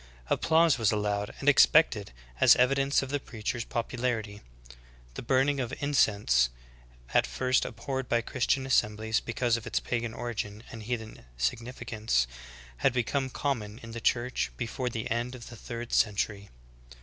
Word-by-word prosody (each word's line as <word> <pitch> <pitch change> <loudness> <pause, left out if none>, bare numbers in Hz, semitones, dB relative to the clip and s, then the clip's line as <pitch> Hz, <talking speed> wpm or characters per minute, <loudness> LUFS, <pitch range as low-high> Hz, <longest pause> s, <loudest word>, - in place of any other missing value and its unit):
Applause 160 -5 +3
was 110 -3 +3
allowed 105 -1 -1
and 140 - -6
expected 140 - +5 0.3
as - - +8
evidence 135 +2 +2
of 135 - -6
the 145 - 0
preacher's 115 -2 -4
popularity. 115 -3 -3 0.7
The - - -6
burning 135 +3 +2
of 125 -2 -2
in 145 0 -2
cense, 85 - +3 0.6
at - - +4
first 130 0 +1
abhorred 130 +1 -4
by 120 - +2
Christian 130 +3 0
assemblies 110 -3 +1
because 120 0 0
of 115 - -8
its - - 0
pagan 115 -1 -3
origin 110 -3 -4
and 115 - -8
heathen 110 - -5
significance, 110 - -1 0.5
had 65 - +2
become 130 +2 0
com 140 -1 -1
mon 105 +1 -9
in 115 - -8
the 115 0 -6
Church 125 +2 0
before 125 +1 -3
the 115 -2 -4
end 120 +2 -1
of 120 - -10
the 120 - -10
third 120 +1 -7
century. 100 -1 +1
120 Hz, 155 wpm, -29 LUFS, 110-130 Hz, 0.7 s, as